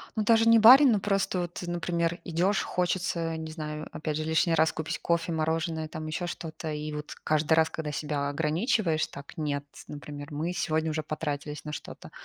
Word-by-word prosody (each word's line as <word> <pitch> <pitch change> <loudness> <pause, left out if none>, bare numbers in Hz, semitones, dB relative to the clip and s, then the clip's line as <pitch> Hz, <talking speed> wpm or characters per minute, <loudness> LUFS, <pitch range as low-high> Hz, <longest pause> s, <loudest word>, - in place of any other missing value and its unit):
Ну, 215 - +1
даже 225 +1 +4
не 230 0 +7
барин, 255 +5 +9
но 210 - +3
просто 195 -2 0
вот, 175 +1 -5
например, 170 0 -1
идёшь, 180 +4 +1
хочется, 175 -2 -1
не 160 0 -6
знаю, 155 -1 -5
опять 150 -1 -3
же 155 - -2
лишний 160 +1 +2
раз 160 0 +3
купить 160 -1 -4
кофе, 170 0 0
мороженое, 160 0 -1
там 155 0 -6
ещё 165 +3 -3
что-то. 160 -2 -6
И 150 0 -4
вот 150 0 -6
каждый 155 +1 +2
раз, 160 0 +4
когда 155 -2 -4
себя 145 -1 -2
ограничиваешь 160 - +1
так: 140 +5 -11
"Нет, 145 -2 -2 0.2
например, 145 0 -8
мы 160 +4 -2
сегодня 160 -3 0
уже 155 0 -2
потратились 150 -1 -4
на 150 - -5
что-то". - - -8
160 Hz, 185 wpm, -28 LUFS, 150-175 Hz, 0.2 s, барин